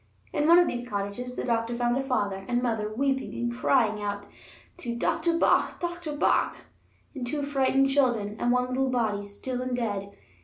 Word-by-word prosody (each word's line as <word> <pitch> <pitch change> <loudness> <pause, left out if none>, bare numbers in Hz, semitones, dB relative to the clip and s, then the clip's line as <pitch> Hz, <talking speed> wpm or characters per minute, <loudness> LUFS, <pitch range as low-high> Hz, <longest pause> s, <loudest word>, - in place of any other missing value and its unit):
In 295 0 +1
one 340 +1 +8
of 350 - +5
these 245 0 -4
cottages 205 +5 -4
the - - -3
doctor 230 0 0
found 240 0 +1
a 270 - +1
father 205 -7 -1
and 245 0 0
mother 220 -3 -1
weeping 270 +3 -1
and 240 0 -2
crying 230 -4 +2
out 205 0 -3 0.5
to 235 -1 -4
"doctor 330 +7 +1
bach, - - +2
doctor 345 -3 -4
bach," - - +2 0.6
and 255 -4 -5
two 290 +3 -2
frightened 270 -1 +2
children, 240 -7 +1
and 240 - +2
one 250 0 +1
little 260 +1 0
body, 220 -5 0
still 245 +5 -5
and 255 -1 -2
dead. 205 -4 -2
245 Hz, 185 wpm, -27 LUFS, 215-270 Hz, 0.6 s, one